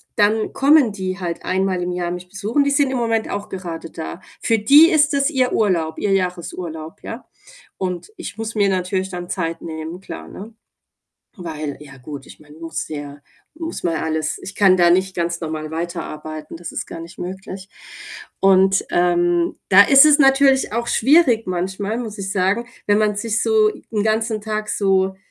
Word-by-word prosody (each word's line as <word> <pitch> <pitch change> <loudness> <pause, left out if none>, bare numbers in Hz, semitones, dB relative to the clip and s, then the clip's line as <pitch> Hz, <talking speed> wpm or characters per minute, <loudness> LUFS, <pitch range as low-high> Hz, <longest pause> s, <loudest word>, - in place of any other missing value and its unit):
dann 215 +1 +2
kommen 280 -3 +4
die 190 -1 -4
halt 170 -2 -4
einmal 185 -1 0
im 180 - -2
Jahr 175 -1 -2
mich 180 0 -7
besuchen. 210 +9 0
Die 280 - +1
sind 280 -1 +2
im 255 - -1
Moment 225 -1 -1
auch 205 0 -4
gerade 170 -3 -6
da. 170 +2 -7 0.2
Für 225 -1 +2
die 290 - +7
ist 300 -1 +3
das 280 +2 +2
ihr 255 -3 +1
Urlaub, 170 -7 0
ihr 205 - -1
Jahresurlaub, 175 -3 -4
ja? 230 +3 -8 0.5
Und 185 - -4
ich 210 - -8
muss 225 0 -4
mir 205 -2 +2
natürlich 185 0 -1
dann 175 -1 -6
Zeit 165 -3 -3
nehmen, 160 +2 -6
klar, - - -9
ne? 215 +3 -10 0.8
Weil 155 -5 -5
ja 140 -2 -12
gut, 135 +1 -9
ich - - -14
meine, 150 0 -17
muss 165 0 -5
ja 145 -1 -7 0.4
muss 330 0 -5
mal 165 -2 0
alles 160 -1 -2
ich 200 - -8
kann 190 -2 +5
da 175 -1 +4
nicht 190 +2 +2
ganz 170 0 -2
normal 155 -2 -5
weiterarbeiten, 155 -2 -6
das 170 0 -8
ist - - -5
gar 165 - -8
nicht 165 +1 -11
möglich. 190 +1 -7 0.7
Und, 195 0 +4
ähm, 175 -1 +1
da 195 +1 +9
ist 275 +6 +7
es 300 -1 +6
natürlich 270 -2 +4
auch 235 +1 -2
schwierig 250 - +3
manchmal, 190 +4 -2
muss 220 -3 -6
ich 195 -1 -4
sagen, 195 +4 0 0.2
wenn 205 0 +3
man 210 -1 +1
sich 220 +1 -1
so 220 -1 +4 0.2
'n 210 -2 0
ganzen 220 0 0
Tag 215 0 -4
so 190 -2 +1
190 Hz, 185 wpm, -20 LUFS, 170-220 Hz, 0.8 s, da